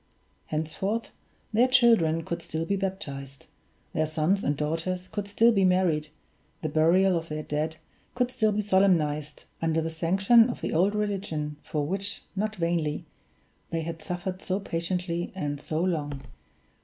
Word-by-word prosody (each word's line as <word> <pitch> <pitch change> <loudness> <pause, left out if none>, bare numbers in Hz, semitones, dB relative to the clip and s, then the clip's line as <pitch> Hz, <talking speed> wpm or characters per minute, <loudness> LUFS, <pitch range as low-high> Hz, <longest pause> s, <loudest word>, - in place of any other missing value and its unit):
Henceforth, 190 +9 -2 0.4
their 235 +4 +5
children 225 -11 +4
could 170 0 -3
still 160 0 -3
be 200 - 0
baptized, 140 -9 -5 0.5
their 155 0 +1
sons 160 +6 +1
and 145 0 0
daughters 165 +5 -2
could 205 0 -4
still 225 +3 +4
be 200 -4 +3
married, 180 -5 +3 0.6
the 155 - 0
burial 175 +5 +4
of 165 -1 -3
their 155 0 -3
dead 155 +2 -2 0.4
could 250 0 +1
still 220 -3 +2
be 210 +1 0
solemnized, 170 -7 +2 0.2
under 165 0 +1
the 160 0 -2
sanction 195 +8 +4
of 240 - -5
the - - -2
old 190 +6 +3
religion 190 -8 -2
for 150 -2 -2
which, 195 +5 -3
not 215 +2 -1
vainly, 165 -3 -1 0.6
they 165 - -1
had 165 0 -5
suffered 180 +3 -4
so 190 +1 -1
patiently 175 -1 -2
and 145 -5 -3
so 155 +1 -2
long. 150 -6 -1
170 Hz, 155 wpm, -27 LUFS, 155-195 Hz, 0.6 s, their